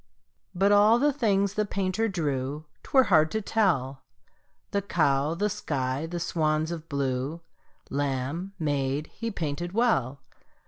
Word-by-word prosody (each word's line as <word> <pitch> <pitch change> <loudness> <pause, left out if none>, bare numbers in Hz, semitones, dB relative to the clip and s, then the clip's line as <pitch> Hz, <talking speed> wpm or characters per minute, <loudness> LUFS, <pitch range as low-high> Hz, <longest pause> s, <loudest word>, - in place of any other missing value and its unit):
But 195 +3 +3
all 210 +3 +6
the 290 +3 +2
things 200 -7 +1
the 210 - +1
painter 200 +1 -1
drew 145 -4 -2 0.2
'Twere 265 -1 +4
hard 160 -8 +4
to 220 - -1
tell 165 - 0 0.7
The 200 - 0
cow, 155 -5 +1
the 205 +4 0
sky, 135 -5 -2
the 175 +1 -4
swans 155 -1 0
of 165 -1 -7
blue, 140 +2 -2 0.5
Lamb, 145 +7 -2
maid, 145 -1 -1
he 230 - -4
painted 175 -2 -4
well. 140 - +1
165 Hz, 135 wpm, -27 LUFS, 140-200 Hz, 0.7 s, all